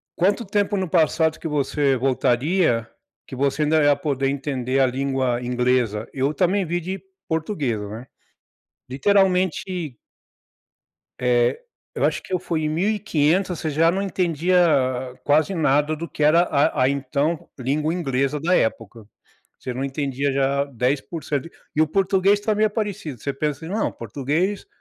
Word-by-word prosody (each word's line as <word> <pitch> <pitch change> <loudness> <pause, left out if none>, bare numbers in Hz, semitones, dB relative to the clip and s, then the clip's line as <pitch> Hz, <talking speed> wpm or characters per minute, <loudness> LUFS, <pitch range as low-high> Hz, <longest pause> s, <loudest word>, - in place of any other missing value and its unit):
quanto 200 +6 +1
tempo 205 +1 0
no 185 -2 -1
passado 160 -1 +2
que - - -5
você 140 -2 +1
voltaria, 125 - +1 0.4
que - - -8
você 140 +3 0
ainda 155 +1 +2
é 145 -2 +4
poder 140 -2 -1
entender 135 -2 -2
a 135 - +5
língua 130 -1 -1
inglesa. 125 -3 0
Eu 135 +2 0
também 185 +5 +1
vi 175 +1 -1
de 185 +2 -5 0.3
portuguesa, 150 - -2
né, 115 +5 -8 0.8
literalmente 180 - +1 1.2
É, 125 - +2 0.3
eu - - 0
acho - - 0
que - - -8
eu 180 - +1
fui 165 -3 -2
em 155 - 0
1500 180 -1 +1
e - - -7
você 160 - -1
já 165 +3 +3
não 190 +2 -1
entendia 180 -2 +1 0.7
quase 150 +5 +2
nada 150 -2 +2
do 165 +2 -6
que 150 - -3
era 155 +3 +5
a 145 -4 +1
a 130 - +4
então 140 +4 -1
língua 150 +5 0
inglesa 140 -3 -1
da 175 +5 +2
época. 110 0 -2 0.5
Você 125 - -5
não 130 +2 -3
entendia 140 0 -2
já 140 +1 +1
10% 140 +3 -2 0.3
e 155 - +1
o 155 - +5
português 195 +3 +2
também 215 0 +2
é - - +1
parecido, 205 - -4
você 140 - -2
pensa 150 +2 -3
assim: 165 - -6
não 215 - 0
português, 145 - -2
150 Hz, 155 wpm, -22 LUFS, 135-180 Hz, 1.2 s, a